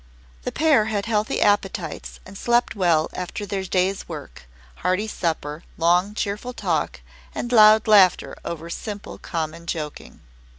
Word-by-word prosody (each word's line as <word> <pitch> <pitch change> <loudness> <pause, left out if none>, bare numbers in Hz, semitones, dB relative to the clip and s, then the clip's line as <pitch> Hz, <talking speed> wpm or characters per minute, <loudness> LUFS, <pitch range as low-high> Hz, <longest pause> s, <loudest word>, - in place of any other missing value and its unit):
The - - -4
pair 295 -8 +3
had 210 -2 -2
healthy 215 -1 0
appetites 195 -5 0
and 190 - -12
slept 240 +4 +1
well 170 -5 +2
after 185 +3 -5
their 195 -1 -3
day's 190 +1 0
work, 145 - -9 0.3
hearty 185 +4 0
supper, 160 -5 -3
long 180 +5 +2
cheerful 210 +5 -3
talk, - - -2 0.3
and 240 - -4
loud 215 -2 +7
laughter 200 -4 +5
over 165 0 -5
simple 205 +2 -6
common 165 0 -4
joking. 155 -3 -6
190 Hz, 135 wpm, -23 LUFS, 170-215 Hz, 0.3 s, loud